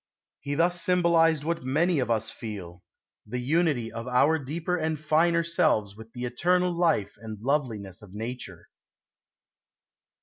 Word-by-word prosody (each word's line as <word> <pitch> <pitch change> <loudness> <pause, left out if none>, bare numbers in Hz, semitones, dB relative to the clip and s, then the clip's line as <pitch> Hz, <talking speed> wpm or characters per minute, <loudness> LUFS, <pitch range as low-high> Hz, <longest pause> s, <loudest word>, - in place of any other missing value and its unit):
He 140 0 -3
thus 175 +2 +2
symbolized 170 -4 +3
what 165 +1 -2
many 155 +5 +2
of 125 -3 -1
us 115 -2 0
feel 95 -6 -8 0.4
the 120 +4 -5
unity 135 -3 +1
of 115 +1 -6
our 140 +6 +3
deeper 160 +6 -2
and 160 -3 -1
finer 165 +3 +2
selves 110 -11 +1
with 110 +1 -12
the 125 -1 -4
eternal 180 +9 +1
life 170 - +1
and 110 -1 -8
loveliness 115 -7 -2
of 105 -3 -14
nature. 115 +5 -7
140 Hz, 140 wpm, -27 LUFS, 115-170 Hz, 0.4 s, symbolized